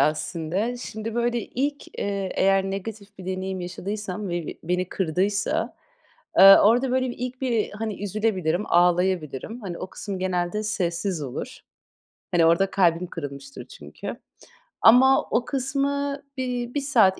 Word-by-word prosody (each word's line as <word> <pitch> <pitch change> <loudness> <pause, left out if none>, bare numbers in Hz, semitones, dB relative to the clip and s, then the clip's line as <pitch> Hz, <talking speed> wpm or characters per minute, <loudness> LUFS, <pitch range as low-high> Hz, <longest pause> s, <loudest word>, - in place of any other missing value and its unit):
aslında. 170 - 0
Şimdi, 225 -2 -6
böyle, 240 0 +1
ilk, 285 +5 -4
eee, 200 -1 -2
eğer 195 0 +3
negatif 200 0 -7
bir 185 - -9
deneyim 190 0 -3
yaşadıysam 195 +2 -5
ve 175 -2 -3
b - - -4
beni 180 +1 -1
kırdıysa, 195 +4 0 0.6
aaa, 195 +1 +9
orada, 245 +3 +3
böyle, 255 0 +1
bir - - -8
ilk 250 +1 -5
bir, 235 -5 0
hani, 210 -1 -5
üzülebilirim, 200 -3 0
ağlayabilirim. 180 - +1
Hani, 180 -4 -5
o - - -5
kısım 200 -3 -5
genelde 185 +2 -1
sessiz 180 -4 -1
olur. 130 -3 -6 0.7
Hani, 170 -2 +4
orada 170 +4 +3
kalbim 175 -2 +2
kırılmıştır 145 - -8
çünkü. - - -8 0.7
Ama 265 +4 +6
o 235 +1 +1
kısmı 280 +1 -1
bir 245 -2 -3
1 285 - 0
saat 225 -9 +4
200 Hz, 140 wpm, -24 LUFS, 180-240 Hz, 0.7 s, aaa